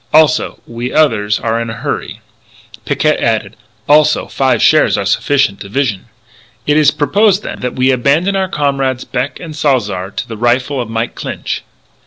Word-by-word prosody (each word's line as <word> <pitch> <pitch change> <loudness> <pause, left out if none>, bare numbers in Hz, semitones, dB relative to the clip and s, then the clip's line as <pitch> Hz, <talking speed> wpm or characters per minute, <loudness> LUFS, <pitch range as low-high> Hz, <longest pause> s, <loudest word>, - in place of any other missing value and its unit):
Also, 155 -4 +3
we 120 +2 -5
others 110 -9 +2
are 115 0 -1
in 115 - -4
a 115 - -5
hurry." - - -4 0.6
Picquet - - +1
added: - - -1 0.3
"Also 150 +1 +4
five 135 -1 +1
shares - - +4
are - - -2
sufficient 140 -8 +1
division." 105 -1 -2 0.6
"It 150 - +2
is 150 -2 +5
propose, 190 +8 +2
then, - - -7
that 125 - -4
we 130 +1 +2
abandon 145 +10 +1
our 190 -1 0
comrades 135 -4 -1
Beck 130 +2 -3
and 160 -3 -8
Salzar 105 -11 0
to - - -5
the 110 - -7
rifle 125 +4 +1
of 120 - -6
Mike 115 +1 -2
Clinch?" - - -5
130 Hz, 165 wpm, -14 LUFS, 115-150 Hz, 0.6 s, is